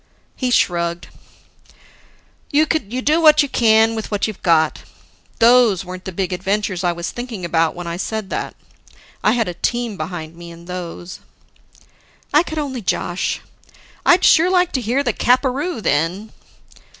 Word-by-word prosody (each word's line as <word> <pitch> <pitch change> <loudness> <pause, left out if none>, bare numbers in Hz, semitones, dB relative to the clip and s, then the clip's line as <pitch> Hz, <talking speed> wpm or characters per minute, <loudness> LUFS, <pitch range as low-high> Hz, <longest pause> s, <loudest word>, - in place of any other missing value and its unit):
He 255 - -2
shrugged. 170 -6 0 1.4
"You 300 +1 +3
do 295 +3 0
what 305 -1 +6
you - - -2
can 225 -3 +3
with 220 -1 -5
what 205 -2 0
you've 215 -3 -6
got. 160 -3 +2 0.6
Those 230 -5 +4
weren't 185 0 -8
the 190 - -5
big 185 0 -2
adventures 190 0 -2
I 175 - +2
was 170 0 -5
thinking 240 -7 -6
about 165 -1 +1
when 175 0 -7
I 170 0 -4
said 215 +1 -4
that. - - -4 0.7
I 215 - +4
had 235 -3 0
a 180 - -3
team 235 +3 -2
behind 160 -1 -6
me 170 0 -11
in 170 0 -13
those 175 0 -7 0.6
" - - -31
I 300 - +6
could 315 -2 -6
only 275 -5 -3
josh. 180 -2 -2 0.6
"I'd 355 +1 +4
sure 345 +2 +5
like 360 -1 +2
to 260 - -1
hear 245 +5 0
the 240 -5 0
capperoo 260 - 0
then." 175 +9 -1
215 Hz, 160 wpm, -19 LUFS, 175-255 Hz, 1.4 s, what